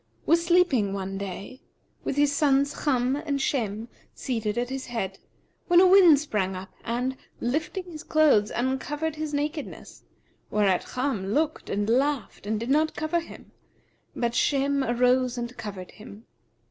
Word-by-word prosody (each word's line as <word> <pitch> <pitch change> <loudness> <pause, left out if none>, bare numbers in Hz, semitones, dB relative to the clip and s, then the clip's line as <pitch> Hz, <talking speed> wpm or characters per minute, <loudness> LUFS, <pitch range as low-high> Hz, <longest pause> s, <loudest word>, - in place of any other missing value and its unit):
was 335 +1 +3
sleeping 335 - +3
one 195 0 -4
day, 200 +6 -7 0.4
with - - -2
his 290 0 +2
sons 280 -1 +1
Cham 260 -1 +2
and 290 -2 -2
Shem 225 -5 -1 0.3
seated 225 -4 -2
at 245 +1 -1
his 265 0 -4
head, 195 -6 -4 0.5
when 350 -1 +6
a 370 - +7
wind 365 -6 +7
sprang 205 -10 -2
up 185 +1 -8
and, 250 +3 -2 0.2
lifting 310 +9 -2
his 335 -4 -9
clothes, 295 -10 +4
uncovered 290 +5 -2
his 310 -1 -3
nakedness; 295 +1 -4 0.5
whereat 200 -3 +1
Cham 250 -7 -1
looked 310 0 -1
and 205 +1 -1
laughed 260 -2 0
and 215 0 -1
did 235 +4 -3
not 310 +2 +2
cover 315 +3 0
him: 335 - -12 0.6
but 235 -1 -1
Shem 275 +1 +1
arose 250 +1 +2
and 240 +1 -5
covered 195 -5 -7
him. 215 0 -13
260 Hz, 150 wpm, -26 LUFS, 220-295 Hz, 0.6 s, a